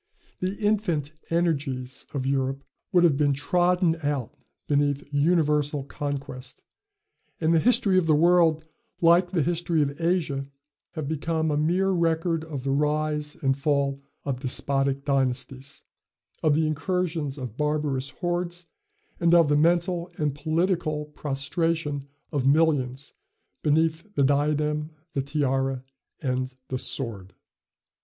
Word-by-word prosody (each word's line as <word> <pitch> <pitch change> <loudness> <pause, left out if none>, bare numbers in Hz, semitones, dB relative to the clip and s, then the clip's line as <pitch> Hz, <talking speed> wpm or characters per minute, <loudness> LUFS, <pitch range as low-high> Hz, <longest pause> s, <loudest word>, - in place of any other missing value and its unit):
The 185 +2 -2
infant 200 -9 0 0.2
energies 140 -7 -1
of 135 -3 -3
Europe 135 0 0 0.3
would 175 -1 +5
have 155 -5 +4
been 145 -1 +3
trodden 175 +3 +2
out 140 -5 -2 0.3
beneath 145 -1 +1
universal 150 -2 +2
conquest, 140 -2 -6 0.8
and 160 0 +2
the 165 - +5
history 195 -2 +4
of 170 - -1
the 155 - +5
world, 165 -1 +4 0.3
like 175 +1 +5
the 175 -5 +1
history 170 0 0
of 140 +3 -4
Asia, 165 -6 0 0.5
have 155 -4 -4
become 160 +1 -1
a - - +1
mere 175 +6 +2
record 165 -1 +1
of 150 -5 -6
the 135 - 0
rise 150 +1 0
and 135 -1 +3
fall 140 -1 0 0.2
of 135 -3 -2
despotic 135 +1 -1
dynasties, 135 0 -1 0.6
of 155 -2 +3
the 160 +1 +2
incursions 160 -2 -1
of 125 -5 -6
barbarous 150 -2 -1
hordes, 175 +2 -3 0.5
and 170 0 +4
of 165 -3 +5
the 145 - +4
mental 170 +2 +2
and 150 -2 0
political 155 0 0
prostration 150 0 -2 0.2
of 140 -3 0
millions 140 -3 +2 0.5
beneath 160 +2 +2
the 140 - +3
diadem, 150 +2 +1 0.2
the 140 - 0
tiara, 135 -2 -1 0.4
and 130 -2 -2
the 130 - -2
sword. 105 -9 -3
150 Hz, 130 wpm, -26 LUFS, 140-165 Hz, 0.8 s, would